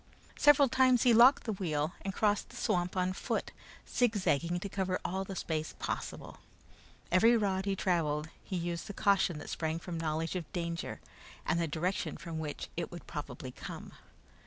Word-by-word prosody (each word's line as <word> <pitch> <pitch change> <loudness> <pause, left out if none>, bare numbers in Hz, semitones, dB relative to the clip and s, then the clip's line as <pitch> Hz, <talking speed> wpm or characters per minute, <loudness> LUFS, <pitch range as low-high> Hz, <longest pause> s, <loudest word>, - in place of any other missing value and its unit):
Several 290 -1 +6
times 255 -1 +4
he 245 -2 +6
locked 245 +5 +7
the 220 - -2
wheel 155 -5 -1
and 195 - -3
crossed 205 +1 +1
the - - -13
swamp 180 +1 0
on 185 0 +1
foot, - - -2 0.4
zigzagging 175 - +1
to 200 - -3
cover 190 -1 -1
all 190 +2 -1
the 195 0 -7
space 155 -3 -3
possible. - - -5 0.7
Every 225 +7 +6
rod 195 -3 0
he 195 -1 0
traveled 160 -5 0
he 190 - -5
used 170 -1 -3
the 205 - -6
caution 195 -4 +3
that - - -7
sprang 160 0 -1
from 170 0 -5
knowledge 160 +2 -1
of 175 -4 -4
danger 170 -2 -3 0.4
and 170 - +1
the 165 - 0
direction 170 +5 -2
from 165 -2 -6
which 150 -2 -4
it - - -2 0.2
probably - - -6
would - - -14
come. - - -7
180 Hz, 175 wpm, -32 LUFS, 165-200 Hz, 0.7 s, locked